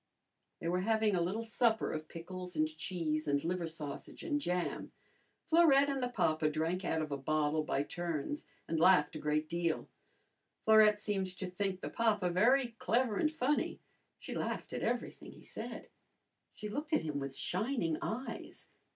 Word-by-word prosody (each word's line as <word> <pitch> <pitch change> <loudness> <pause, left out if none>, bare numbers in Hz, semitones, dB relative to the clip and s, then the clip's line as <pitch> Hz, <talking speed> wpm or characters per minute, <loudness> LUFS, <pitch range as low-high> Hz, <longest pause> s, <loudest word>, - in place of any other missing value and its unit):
They 165 - -4
were 180 +2 +1
having 220 +1 +2
a 175 - +2
little 195 +7 -1
supper 225 0 +2
of 155 0 -4
pickles 180 +2 -7
and 155 0 +3
cheese 155 -1 -2
and 145 0 +1
liver 175 0 -1
sausage 150 -3 -7
and 295 -4 0
jam. 180 -6 -2 0.5
Florette 285 -4 +6
and 270 -1 -2
the 250 - 0
papa 155 -9 +2
drank 165 +5 -1
out 160 -2 0
of 155 - -6
a 140 - -1
bottle 155 +2 +1
by 140 - 0
turns 175 - -3 0.2
and 160 0 0
laughed 165 -3 +5
a - - -4
great 150 +1 0
deal. 170 -1 -1 0.7
Florette 215 -1 +6
seemed 205 -2 -1
to 190 - -3
think 185 +1 -2
the - - -4
papa 210 -6 +2
very 240 +8 +4
clever 235 -2 +1
and 305 - +2
funny. 295 -1 0 0.4
She - - -7
laughed - - -3
at - - -3
everything - - -3
he - - -15
said. - - -7 0.7
She 210 - -5
looked 295 +8 -4
at - - +3
him 150 -2 -2
with 135 -1 -5
shining 185 - -1
eyes. 250 +5 -5
180 Hz, 170 wpm, -34 LUFS, 155-225 Hz, 0.7 s, Florette